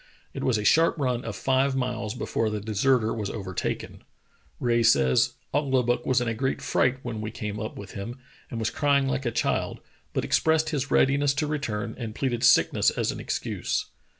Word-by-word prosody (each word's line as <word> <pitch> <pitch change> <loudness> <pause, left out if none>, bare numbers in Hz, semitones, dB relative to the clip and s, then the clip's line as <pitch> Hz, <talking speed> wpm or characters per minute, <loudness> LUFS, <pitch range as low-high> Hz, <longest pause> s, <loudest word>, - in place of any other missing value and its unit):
It - - -5
was 125 -4 +2
a 105 - -3
sharp 165 +6 +4
run 125 -4 -1
of - - -5
five 135 +1 +1
miles 125 -4 -2
before 110 - -1
the 105 0 -2
deserter 110 +3 +1
was 105 -3 -3
over 95 -4 -6
taken. - - -4 0.6
Rae 120 -1 +2
says: 70 - +4 0.2
"Ouglibuck 130 -4 +1
was 130 -1 +3
in 120 - -2
a 115 - 0
great 130 +4 -1
fright 130 0 +1
when 115 -3 -4
we 110 - -3
came 105 -1 -5
up 110 - -5
with 100 -2 -9
him, 115 +6 -6 0.3
and 115 - -5
was 110 -2 -1
crying 140 -2 +2
like 135 -1 -1
a - - 0
child, 120 - -1 0.3
but - - -1
expressed 160 0 +2
his 140 -2 -2
readiness 140 +1 +3
to 150 - 0
return, 115 -8 -3
and 110 -3 -5
pleaded 125 -3 -1
sickness 120 - +5
as - - -1
an - - -7
excuse." - - -2
120 Hz, 195 wpm, -26 LUFS, 110-135 Hz, 0.6 s, sickness